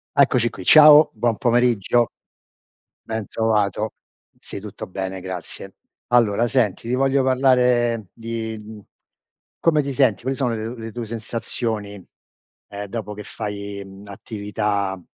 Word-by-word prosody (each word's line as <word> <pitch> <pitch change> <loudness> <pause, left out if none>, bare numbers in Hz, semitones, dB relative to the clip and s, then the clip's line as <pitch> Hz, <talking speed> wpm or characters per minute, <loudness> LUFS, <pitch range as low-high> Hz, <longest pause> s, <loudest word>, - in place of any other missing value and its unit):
Eccoci 130 -4 +4
qui, 95 - -10
ciao, 150 - +8
buon 115 0 0
pomeriggio. 120 -1 +2 0.9
Ben 110 -2 -4
trovato. 110 -1 0 0.4
Sì, - - -8
tutto 105 0 -8
bene, 95 0 -5
grazie. 90 -2 -6 0.4
Allora 115 -2 +3
senti, 115 -4 0
ti 125 - 0
voglio 135 +1 +2
parlare 125 -5 +2
di 115 -1 -5
mhmm 105 0 -11 0.8
come 155 -3 +3
ti 140 0 -4
senti, 125 -7 +2
quali 130 +2 -2
sono 125 -4 0
le 115 +2 -5
le 115 0 -7
tue 120 +1 -5
sensazioni, 110 -2 -4 0.7
ehm, 100 0 -6
dopo 105 0 -5
che 105 0 -9
fai, 100 -1 -6
mhmm, 95 +1 -13
attività 100 0 -3
a 95 - -8
110 Hz, 135 wpm, -22 LUFS, 100-120 Hz, 0.9 s, ciao